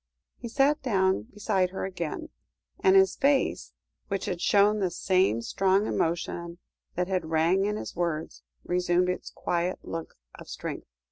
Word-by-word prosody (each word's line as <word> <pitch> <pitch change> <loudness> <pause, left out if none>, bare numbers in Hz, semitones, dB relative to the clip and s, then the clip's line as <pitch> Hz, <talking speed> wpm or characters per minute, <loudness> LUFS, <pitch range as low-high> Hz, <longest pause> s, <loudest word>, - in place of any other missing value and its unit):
He 240 - -6
sat 280 +5 +2
down 190 - +1
beside 200 -3 0
her 190 - -4
again, 185 - -5 0.5
and 385 0 +4
his 385 0 +5
face, 280 -1 +1 0.4
which 195 -2 -2
had 175 -1 -3
shown 205 +1 +4
the 190 -2 +1
same 180 - +1
strong 195 - +2
emotion 170 -1 -2 0.4
that 180 0 0
had 185 -4 -2
rang 165 +5 +2
in 210 +1 -1
his - - -7
words, 165 -2 -3 0.2
resumed 180 0 +1
its 180 - -3
quiet 175 +1 -2
look 165 -1 -6 0.2
of - - -12
strength. - - -6
185 Hz, 150 wpm, -27 LUFS, 170-205 Hz, 0.5 s, his